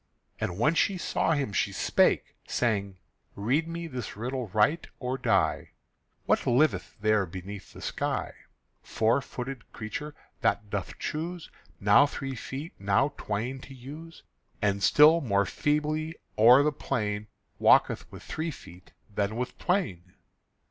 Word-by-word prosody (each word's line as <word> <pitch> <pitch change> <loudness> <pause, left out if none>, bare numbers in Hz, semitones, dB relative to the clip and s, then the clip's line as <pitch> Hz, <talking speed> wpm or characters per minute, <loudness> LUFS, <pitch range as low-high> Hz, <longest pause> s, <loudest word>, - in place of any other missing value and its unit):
And 90 - -2
when 150 +9 +3
she 190 +3 +2
saw 165 - 0
him 135 -9 -1
she 100 +1 +1
spake, 95 - +2
saying: 100 -5 0 0.4
"Read 130 +11 +1
me 170 0 -5
this 125 -10 -6
riddle 125 +2 -3
right, 110 - +2
or 125 0 -2
die: 115 -6 +1 0.5
What - - +1
liveth 140 +6 +2
there 105 -2 +2
beneath 95 +3 -8
the - - -10
sky, - - -2 0.5
Four 115 +5 +1
footed 130 -1 -7
creature 150 +7 -6 0.2
that 105 -2 0
doth 100 -3 -4
choose 165 +2 -4 0.3
Now 105 +8 +6
three 135 -1 -5
feet 135 +6 -6
and 100 - -12
now 135 +9 +3
twain 115 +6 -3
to 135 +1 -11
use, 150 +6 -10 0.4
And 100 -1 +1
still 155 - +6
more 100 -7 +2
feebly 150 +6 -1 0.2
o'er 125 +6 +7
the 150 - +2
plain 105 -7 -2 0.3
Walketh - - +4
with - - -10
three 160 +1 -3
feet 90 - -12 0.2
than 100 +1 -1
with 125 +1 -3
twain?" 95 - -1
125 Hz, 140 wpm, -28 LUFS, 105-150 Hz, 0.5 s, o'er